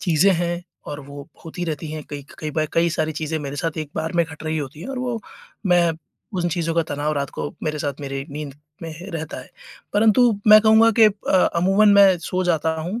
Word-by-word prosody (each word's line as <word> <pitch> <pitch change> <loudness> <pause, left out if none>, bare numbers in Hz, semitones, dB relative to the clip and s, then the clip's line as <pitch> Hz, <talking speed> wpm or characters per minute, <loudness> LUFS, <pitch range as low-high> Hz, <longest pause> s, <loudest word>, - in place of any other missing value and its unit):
चीज़ें 180 +2 +3
हैं 175 0 -2 0.2
और 145 - -6
वो 140 0 -10 0.2
होती 170 +2 -5
रहती 160 -2 -4
हैं, 155 -1 -5
कई 145 -1 -6
क - - -13
कई 155 - -4
बा 155 +1 0
कई 170 +1 +3
सारी 155 0 -1
चीज़ें 160 0 -2
मेरे 145 -1 -6
साथ 160 +2 -3
एक 155 -2 -5
बार 160 +1 -2
में 170 - +4
घट 160 -1 -11
रही 155 0 -1
होती 145 +1 -6
हैं 180 - -7
और 270 -1 -4
वो 245 -2 -3 0.5
मैं 175 -2 +4 0.5
उन 175 0 0
चीज़ों 165 -1 -2
का 165 - +3
तनाव 145 +1 -1
रात 140 -1 -2
को - - -4
मेरे 155 -1 -2
साथ 145 -1 -4
मेरे 135 -1 -4
नींद 145 -1 -6 0.3
में 165 - -5
ह 170 +5 -9
रहता 160 -3 -5
है। 125 - -15 0.4
परंतु 225 +4 +4 0.2
मैं 215 0 +10
कहूँगा 220 +1 +6
कि 225 - +8
अ, 210 -1 +1 0.2
अमूमन 195 +5 +4
मैं 195 -2 +7
सो 180 +2 -2
जाता 160 -2 +1
हूँ 185 +9 -4
165 Hz, 230 wpm, -22 LUFS, 150-185 Hz, 0.5 s, मैं